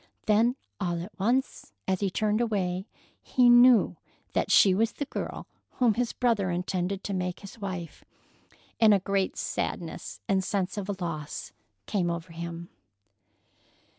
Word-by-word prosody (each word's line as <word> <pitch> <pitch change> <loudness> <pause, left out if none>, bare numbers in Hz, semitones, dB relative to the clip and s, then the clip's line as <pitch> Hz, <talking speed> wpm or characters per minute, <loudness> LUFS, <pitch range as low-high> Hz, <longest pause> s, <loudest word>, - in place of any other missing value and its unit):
Then 225 +4 +3 0.2
all 175 -3 -1
at 190 +4 -9
once, 235 - 0
as 190 -1 +1
he 200 - 0
turned 215 +4 0
away, 190 -4 -1 0.3
he 245 -1 +4
knew 240 -1 +6 0.4
that - - 0
she 195 - +6
was 225 +4 +1
the 285 - -4
girl - - -5 0.3
whom 240 -4 +3
his 240 +2 -1
brother 225 -6 +1
intended 180 +2 -2
to 200 - -3
make 180 -1 -3
his 200 +3 -11
wife, 185 -5 -6 0.8
and 215 -2 +7
a - - +2
great 195 0 -1
sadness 165 -2 -4
and 190 -1 +2
sense 190 -1 -1
of 205 -1 -4
a 200 - -1
loss 155 -4 -5 0.3
came 180 -4 0
over 170 0 -4
him. 170 0 -6
195 Hz, 150 wpm, -28 LUFS, 180-220 Hz, 0.8 s, and